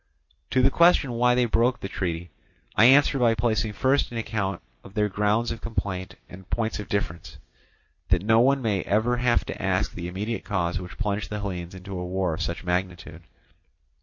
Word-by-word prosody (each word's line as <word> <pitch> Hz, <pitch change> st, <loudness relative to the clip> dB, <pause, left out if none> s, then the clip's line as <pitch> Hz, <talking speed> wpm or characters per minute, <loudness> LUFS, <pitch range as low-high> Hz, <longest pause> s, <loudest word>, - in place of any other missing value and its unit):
To 130 Hz, -, +2 dB
the 135 Hz, -, +5 dB
question 170 Hz, -5 st, +4 dB
why 125 Hz, +1 st, +3 dB
they 125 Hz, 0 st, +3 dB
broke 120 Hz, +2 st, +1 dB
the -, -, -5 dB
treaty, 85 Hz, -3 st, -4 dB, 0.4 s
I 110 Hz, -, +6 dB
answer 135 Hz, +2 st, +5 dB
by 115 Hz, -2 st, +3 dB
placing 110 Hz, -1 st, 0 dB
first 135 Hz, +5 st, +1 dB
an 120 Hz, -, -5 dB
account 105 Hz, -4 st, -2 dB, 0.2 s
of 95 Hz, -, -14 dB
their 105 Hz, -1 st, +2 dB
grounds 105 Hz, +3 st, 0 dB
of 115 Hz, -, -6 dB
complaint 100 Hz, -5 st, -4 dB
and 95 Hz, +1 st, -13 dB
points 110 Hz, -2 st, -1 dB
of 105 Hz, -, -7 dB
difference, 90 Hz, -4 st, -3 dB, 0.7 s
that 90 Hz, -1 st, +2 dB
no 110 Hz, +1 st, +5 dB
one 135 Hz, +2 st, +3 dB
may 105 Hz, -4 st, +1 dB
ever 110 Hz, +6 st, +1 dB
have 120 Hz, -1 st, +2 dB
to -, -, -6 dB
ask -, -, 0 dB
the 85 Hz, -1 st, -5 dB
immediate 105 Hz, +6 st, -4 dB
cause 85 Hz, -4 st, -1 dB
which 90 Hz, -1 st, -9 dB
plunged 105 Hz, -1 st, -2 dB
the 105 Hz, -, -4 dB
Hellenes 90 Hz, -3 st, -5 dB
into 95 Hz, 0 st, -7 dB
a -, -, -4 dB
war 90 Hz, -1 st, -1 dB
of -, -, -4 dB
such 85 Hz, -, -3 dB
magnitude. 90 Hz, -2 st, -3 dB
105 Hz, 195 wpm, -25 LUFS, 90-115 Hz, 0.7 s, I